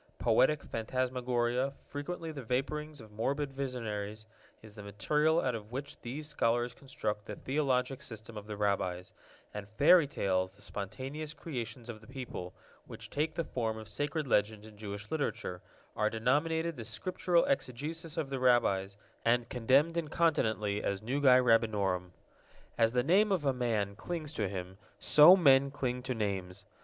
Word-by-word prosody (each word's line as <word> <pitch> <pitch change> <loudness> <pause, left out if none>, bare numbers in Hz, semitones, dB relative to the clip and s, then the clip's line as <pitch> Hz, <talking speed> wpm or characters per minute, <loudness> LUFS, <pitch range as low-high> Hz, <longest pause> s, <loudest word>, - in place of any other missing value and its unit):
Poetic 150 +2 +3
phantasmagoria, 125 +2 -1
frequently 160 +3 -5
the 145 -3 -7
vaporings 145 +5 -2
of 110 -1 -14
morbid 135 +6 -2
visionaries, 110 -6 -4 0.4
is 110 -2 -12
the 105 - -10
material 150 - +1
out 130 -5 0
of 110 -1 -7
which 135 +3 -6
these 145 +6 -5
scholars 120 -4 +1
construct 110 -6 -4
the - - -5
theologic 135 -2 0
system 115 -4 -7
of 105 0 -8
the 105 -1 -5
Rabbis, 95 -3 -1 0.4
and 105 -1 -7
fairy 165 +1 +7
tales, 95 -8 0
the - - -21
spontaneous 135 +9 -5
creations 120 -6 -6
of 110 -3 -8
the 110 - -16
people, 125 -9 -6 0.4
which - - -10
take 155 +2 -1
the 170 - 0
form 115 -6 -2
of 110 -1 -8
sacred 145 +8 -2
legend 105 -2 +1
in 110 -1 -13
Jewish 105 0 -7
literature, 115 - -2 0.3
are 105 0 +2
denominated 155 +7 0
the 115 - -5
Scriptural 170 - +1
exegesis 165 - -2
of 150 -4 -2
the 135 - -2
Rabbis, 100 -6 +2 0.3
and 120 0 +2
condemned 135 +7 +3
incontinently 110 - +1
as 100 +1 -2
nugae 130 +1 +5
rabbinorum. 105 -6 +2 0.7
As 115 0 +3
the 125 -1 +2
name 200 - +4
of 180 -6 +1
a 135 - +3
man 110 -5 -1
clings 160 - -4
to 105 -9 -1
him, 95 0 -6 0.2
so 155 - +8
men 140 -5 +5
cling 125 -3 -2
to 130 0 -3
names. 100 -3 -3
125 Hz, 155 wpm, -32 LUFS, 105-145 Hz, 0.7 s, so